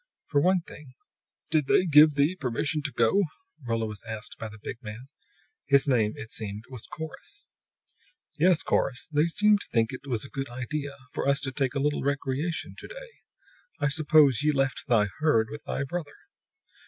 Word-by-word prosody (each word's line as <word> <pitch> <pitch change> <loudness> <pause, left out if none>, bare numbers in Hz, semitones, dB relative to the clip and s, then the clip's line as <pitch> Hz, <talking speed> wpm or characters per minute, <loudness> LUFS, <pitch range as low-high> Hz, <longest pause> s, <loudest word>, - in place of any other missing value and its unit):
For 145 -2 +3
one 185 +2 +3
thing 145 -5 -13 0.6
"Did 150 -3 +2
They 185 - +4
give 150 -2 +7
thee 145 +5 +2
permission 145 +1 -1
to 140 - -1
go?" 120 - +3 0.5
Rolla 115 -1 0
was 105 -2 -7
asked 110 -1 -6
by 115 - -5
the 110 - -12
big 115 +3 -7
man. 115 +3 -9 0.6
His 140 +1 +4
name, 115 -6 +2
it 115 - -8
seemed, 105 -1 -5
was 125 -4 -8
Corrus. 175 - -8 0.9
"Yes, 165 0 +4
Corrus. 125 -3 0
They 150 +2 +3
seemed 210 +4 +3
to - - -6
think 115 +1 +1
it 130 - -6
a 130 -1 -3
good 135 -1 -4
idea 140 +3 -4 0.2
for - - -2
us 140 0 +3
to 135 - -2
take 135 0 -1
a - - +1
little 145 +1 0
recreation 140 +4 -2
to - - -8
day. - - -10 0.7
I 145 - +2
suppose 150 -3 +4
ye 150 0 +3
left 135 -2 -1
thy 110 -4 +4
herd 115 -8 +3
with 150 0 -7
thy 140 - -2
brother?" 150 +1 -5
140 Hz, 180 wpm, -27 LUFS, 120-155 Hz, 0.9 s, give